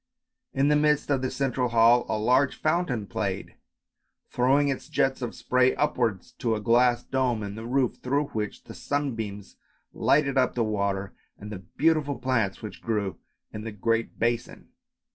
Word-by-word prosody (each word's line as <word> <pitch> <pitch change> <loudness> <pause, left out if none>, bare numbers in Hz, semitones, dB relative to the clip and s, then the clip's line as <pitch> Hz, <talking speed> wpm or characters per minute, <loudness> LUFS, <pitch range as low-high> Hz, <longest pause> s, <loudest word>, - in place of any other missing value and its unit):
In 135 +2 +2
the 150 - +4
midst 150 -1 +2
of 135 -2 +2
the 130 - -1
central 130 -2 -1
hall 115 +1 +5
a - - 0
large 125 +5 +2
fountain 155 - 0
played, - - -3 0.8
throwing 135 +4 +3
its 140 +3 -4
jets 135 -3 +1
of 120 - -4
spray 130 0 +2
upwards 120 -9 -1
to 115 -2 +1
a - - -3
glass 120 +2 +3
dome 125 -4 0
in 100 -1 -5
the 110 +2 -7
roof, 130 0 +1
through 140 +3 0
which 105 -2 -4
the - - -11
sunbeams 115 -9 -4 0.4
lighted 140 -2 +2
up 130 - +1
the 120 - +1
water 100 -2 -1 0.2
and 105 +1 -9
the 100 - -6
beautiful 145 - 0
plants 115 -7 -1
which 110 - -8
grew 105 -5 -2 0.3
in 105 - -6
the 115 - -5
great 115 +3 -1
basin. 120 0 -2
125 Hz, 165 wpm, -26 LUFS, 110-135 Hz, 0.8 s, hall